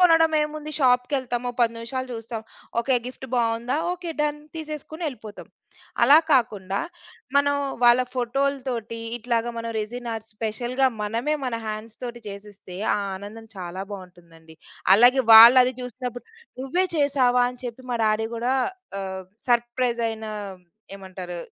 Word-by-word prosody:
కొనడం 325 Hz, -2 st, +5 dB
ఏముంది? 300 Hz, 0 st, -5 dB
షాప్‌కెళ్తామొ 250 Hz, -1 st, +1 dB
10 230 Hz, -1 st, +3 dB
నివిషాలు 255 Hz, +3 st, -4 dB
చూస్తాం. 225 Hz, 0 st, -6 dB, 0.4 s
ఓకే. 260 Hz, +3 st, +2 dB
గిఫ్ట్ 260 Hz, +1 st, -8 dB
బావుందా? 235 Hz, +2 st, 0 dB, 0.2 s
ఓకే. 350 Hz, -2 st, -6 dB
డన్. 295 Hz, 0 st, 0 dB, 0.2 s
తీసేసుకుని 310 Hz, +1 st, -7 dB
ఎళిపోతం. 220 Hz, -6 st, -10 dB, 0.6 s
అలా 280 Hz, +6 st, +8 dB
కాకుండా, 205 Hz, -7 st, +1 dB, 0.6 s
మనం 285 Hz, 0 st, +4 dB, 0.3 s
వాళ్ళ 240 Hz, +1 st, +7 dB
ఫోటోల్తోటి 255 Hz, -2 st, -2 dB, 0.2 s
ఇట్లాగా 235 Hz, 0 st, -1 dB
మనం 230 Hz, 0 st, -4 dB
రెసిన్ 240 Hz, +3 st, -5 dB
ఆర్ట్స్ 225 Hz, 0 st, -8 dB
,స్పెషల్‌గా 240 Hz, +4 st, 0 dB, 0.2 s
మనమే 230 Hz, +8 st, -1 dB
మన 250 Hz, -2 st, -2 dB
హ్యాండ్స్ 215 Hz, +1 st, -6 dB
తోటి 240 Hz, -1 st, -6 dB
చేసీస్తే, 200 Hz, -2 st, -10 dB, 0.2 s
ఆ -, -, +1 dB, 0.2 s
ఆనందం 210 Hz, +3 st, -10 dB
చాలా 180 Hz, +1 st, -5 dB
బావుంటుందండి. 170 Hz, -4 st, -13 dB, 0.4 s
అలాగే, 245 Hz, +5 st, +6 dB
వాళ్ళది 250 Hz, +3 st, +9 dB
చూసినప్పుడు, 250 Hz, 0 st, -6 dB, 0.4 s
"నువ్వే 280 Hz, +8 st, 0 dB
చేసావా" 260 Hz, -4 st, +3 dB
అని 250 Hz, 0 st, -14 dB
చెప్పి 245 Hz, +1 st, -7 dB
మా -, -, 0 dB
డాడీ 215 Hz, +1 st, +1 dB
గూడా, 240 Hz, +3 st, 0 dB, 0.5 s
ఆహ్, 190 Hz, -1 st, -5 dB, 0.2 s
సర్ప్రైజ్ 240 Hz, 0 st, +1 dB
ఐన 220 Hz, 0 st, -6 dB, 0.7 s
ఏమంటారు? 185 Hz, -2 st, -8 dB
240 Hz, 130 wpm, -24 LUFS, 220-260 Hz, 0.7 s, వాళ్ళది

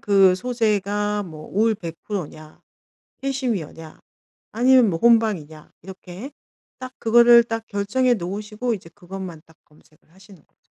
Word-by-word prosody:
그 195 Hz, -2 st, +4 dB
소재가 210 Hz, -2 st, -1 dB
뭐 155 Hz, -3 st, -10 dB
올 220 Hz, +3 st, +2 dB
100% 175 Hz, +1 st, -6 dB
냐, 155 Hz, +1 st, -15 dB, 0.6 s
캐시미어냐, 225 Hz, -, -4 dB, 0.5 s
아니면 250 Hz, 0 st, +4 dB
뭐 165 Hz, -, -2 dB
혼방이냐 205 Hz, -10 st, +1 dB
이렇게 190 Hz, -, -10 dB, 0.5 s
딱 255 Hz, 0 st, -8 dB
그거를 235 Hz, +1 st, +6 dB
딱 225 Hz, -1 st, -5 dB
결정해 235 Hz, +5 st, +1 dB
놓으시고 210 Hz, +5 st, -4 dB
이제 180 Hz, -5 st, -8 dB
그것만 185 Hz, -3 st, -9 dB
딱 160 Hz, -, -22 dB
검색을 155 Hz, +1 st, -27 dB
하시는 190 Hz, -3 st, -18 dB
거죠. -, -, -46 dB
205 Hz, 275 characters per minute, -22 LUFS, 175-230 Hz, 0.6 s, 그거를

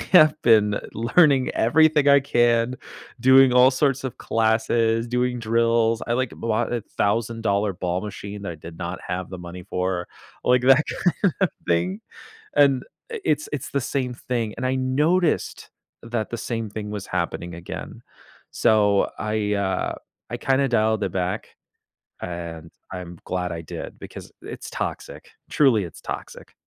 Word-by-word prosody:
I -, -, -6 dB
have 155 Hz, -4 st, +7 dB
been 105 Hz, -3 st, +5 dB, 0.2 s
learning 135 Hz, +3 st, +3 dB
everything 150 Hz, +4 st, +3 dB
I 140 Hz, 0 st, +7 dB
can, 120 Hz, -2 st, +2 dB, 0.4 s
doing 130 Hz, +1 st, +6 dB
all 125 Hz, +1 st, +7 dB
sorts 135 Hz, 0 st, 0 dB
of 130 Hz, -, -5 dB
classes, 115 Hz, +1 st, +1 dB
doing 125 Hz, 0 st, 0 dB
drills, 115 Hz, 0 st, +1 dB
I, 120 Hz, -, -1 dB
like, 130 Hz, -1 st, -1 dB
bought 115 Hz, +1 st, -1 dB
a 120 Hz, -2 st, -1 dB, 0.2 s
$1,000 105 Hz, -1 st, 0 dB
ball 90 Hz, 0 st, -2 dB
machine 105 Hz, 0 st, -7 dB
that 90 Hz, -, -4 dB
I -, -, -8 dB
did 80 Hz, +2 st, -11 dB
not 85 Hz, +1 st, -4 dB
have 90 Hz, 0 st, -4 dB
the 95 Hz, -, -7 dB
money 90 Hz, +1 st, -9 dB
for, 90 Hz, -1 st, -1 dB, 0.4 s
like 125 Hz, 0 st, +3 dB
that 135 Hz, +4 st, +5 dB, 0.4 s
kind 190 Hz, -6 st, +3 dB
of 190 Hz, -, +4 dB, 0.2 s
thing. 90 Hz, +4 st, 0 dB, 0.6 s
And 140 Hz, -3 st, +4 dB, 0.3 s
i 455 Hz, -, -4 dB
it's 150 Hz, 0 st, 0 dB
it's 140 Hz, -1 st, -5 dB
the 140 Hz, -, 0 dB
same 125 Hz, -1 st, -2 dB
thing, 120 Hz, -3 st, -3 dB
and 130 Hz, -, -1 dB
I 130 Hz, -, 0 dB
noticed 150 Hz, +7 st, 0 dB, 0.3 s
that 115 Hz, -2 st, -3 dB
the 120 Hz, -, -3 dB
same 115 Hz, -1 st, -3 dB
thing 105 Hz, 0 st, -6 dB
was 105 Hz, -2 st, -5 dB
happening 85 Hz, -1 st, -3 dB
again, 85 Hz, +1 st, -8 dB, 0.5 s
so 105 Hz, -2 st, +3 dB
I, 105 Hz, -1 st, -1 dB
uh, 100 Hz, -2 st, -1 dB, 0.4 s
I -, -, -2 dB
kinda 135 Hz, 0 st, +1 dB
dialed 110 Hz, -3 st, +1 dB
it -, -, -2 dB
back, 90 Hz, +3 st, -3 dB, 0.7 s
and 85 Hz, -2 st, -6 dB, 0.2 s
I'm 90 Hz, -2 st, -7 dB
glad 90 Hz, -1 st, -2 dB
I 80 Hz, -, -5 dB
did 80 Hz, -, -8 dB
because -, -, -10 dB
it's -, -, -8 dB
toxic, -, -, -5 dB, 0.2 s
truly, 120 Hz, -10 st, +3 dB
it's 85 Hz, -, -11 dB
toxic. -, -, -8 dB
115 Hz, 155 wpm, -23 LUFS, 100-130 Hz, 0.7 s, have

